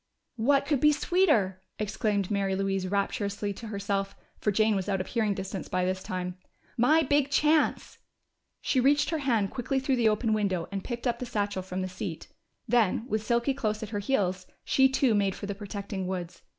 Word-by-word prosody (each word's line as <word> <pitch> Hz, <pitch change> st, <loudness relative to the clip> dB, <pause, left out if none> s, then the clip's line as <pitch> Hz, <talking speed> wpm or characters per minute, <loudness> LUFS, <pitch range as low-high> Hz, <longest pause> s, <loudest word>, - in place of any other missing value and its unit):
"What 275 Hz, +5 st, +3 dB
could 285 Hz, -2 st, +1 dB
be 300 Hz, +3 st, +6 dB
sweeter!" 295 Hz, -, +2 dB, 0.2 s
exclaimed 210 Hz, -1 st, -1 dB
Mary 195 Hz, -1 st, +1 dB
Louise 195 Hz, -1 st, -1 dB
rapturously 200 Hz, +1 st, -1 dB
to 225 Hz, +3 st, -9 dB
herself, 200 Hz, -1 st, -2 dB, 0.2 s
for 210 Hz, -, +1 dB
Jane 215 Hz, +1 st, +3 dB
was 195 Hz, +1 st, -2 dB
out 195 Hz, -1 st, +1 dB
of 185 Hz, -, -2 dB
hearing 215 Hz, -3 st, 0 dB
distance 190 Hz, 0 st, -5 dB
by 180 Hz, 0 st, 0 dB
this 185 Hz, 0 st, -1 dB
time. 180 Hz, 0 st, -4 dB, 0.4 s
"My 305 Hz, +7 st, +4 dB
big 285 Hz, 0 st, +2 dB
chance!" 305 Hz, +2 st, +2 dB, 0.6 s
She 260 Hz, -, +1 dB
reached 285 Hz, +5 st, +3 dB
her 320 Hz, -, 0 dB
hand 230 Hz, -8 st, +1 dB
quickly 265 Hz, +2 st, -1 dB
through 265 Hz, 0 st, 0 dB
the 230 Hz, -2 st, +4 dB
open 215 Hz, +1 st, +1 dB
window 195 Hz, -5 st, 0 dB
and 195 Hz, -1 st, -4 dB
picked 240 Hz, 0 st, -5 dB
up 240 Hz, -1 st, 0 dB
the 250 Hz, -, -4 dB
satchel 205 Hz, -4 st, -1 dB
from 185 Hz, 0 st, -4 dB
the -, -, -2 dB
seat. 180 Hz, -2 st, -6 dB, 0.4 s
Then, 225 Hz, -2 st, +2 dB
with 215 Hz, -1 st, -1 dB
Silky 235 Hz, +4 st, +1 dB
close 215 Hz, -5 st, -2 dB
at 215 Hz, -, -6 dB
her 210 Hz, -2 st, -2 dB
heels, 190 Hz, -5 st, 0 dB, 0.2 s
she 265 Hz, 0 st, +4 dB
too 265 Hz, -2 st, +2 dB
made 200 Hz, -2 st, +1 dB
for -, -, -6 dB
the 200 Hz, -, -3 dB
protecting 200 Hz, -1 st, -5 dB
woods. 180 Hz, -2 st, -5 dB
210 Hz, 195 wpm, -28 LUFS, 195-245 Hz, 0.6 s, be